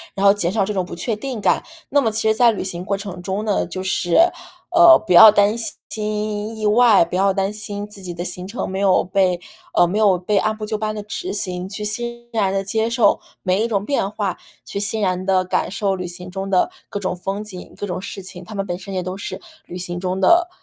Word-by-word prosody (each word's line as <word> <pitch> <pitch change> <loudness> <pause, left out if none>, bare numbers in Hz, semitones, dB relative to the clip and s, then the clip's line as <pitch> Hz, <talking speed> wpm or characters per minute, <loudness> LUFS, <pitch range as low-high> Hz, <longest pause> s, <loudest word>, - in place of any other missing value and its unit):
然 195 - 0
后 200 - +8
减 180 -4 -1
少 200 -1 +1
这 210 - -3
种 185 - 0
不 180 - -8
确 220 +6 -2
定 245 +1 -5
感。 - - +2 0.3
那 285 +1 +3
么 230 - +1
其 220 0 0
实 220 - +4
在 235 +1 +5
旅 215 - -4
行 180 -2 -4
过 195 +1 -1
程 195 -3 -7
中 195 +4 -3
呢， 205 -2 0
就 185 - -5
是， 175 -2 0 0.6
呃， 345 -1 +8
不 180 - +1
要 215 +5 +11
担 205 +1 +3
心 215 -1 -3
意 215 - -3
外， 210 -4 +5
不 175 - -6
要 195 +1 +3
担 195 +1 -1
心 205 -1 -5
自 210 -1 -12
己 180 -2 -6
的 175 - -4
行 180 0 -5
程 215 +5 -4
没 190 +1 -4
有 195 -2 +3
被 185 -1 +1 0.4
呃， - - +6
没 190 +5 -1
有 200 -4 +4
被 190 +4 0
按 215 0 -1
部 215 - -5
就 215 - -3
班 215 0 -2
地 210 - -5
执 360 - -5
行， 185 - -3
去 210 +1 -5
欣 235 +3 -4
然 205 -4 +1
地 195 0 -1
接 220 +3 0
受 235 -3 +3 0.2
每 185 +3 +1
一 - - 0
种 205 -3 -1
变 275 -7 0
化， 205 -3 -3 0.3
去 200 - -4
欣 205 +2 0
然 185 -1 0
地 190 -1 +3
感 180 - 0
受 195 0 -1
旅 180 -1 -5
行 180 +1 -7
中 195 +1 -4
的 185 -2 +2 0.2
各 205 - -4
种 185 -2 -2
风 195 +3 -4
景、 190 -4 -9
各 - - -4
种 180 -2 -4
事 195 0 -7
情， 180 -1 -8
它 195 +5 -10
们 195 -1 -2
本 175 -1 -4
身 195 0 -7
也 185 - -1
都 185 +1 -4
是 200 - -6 0.3
旅 180 - -7
行 175 -1 -4
中 185 +1 -2
的， 345 - +4
200 Hz, 270 characters per minute, -20 LUFS, 185-215 Hz, 0.6 s, 要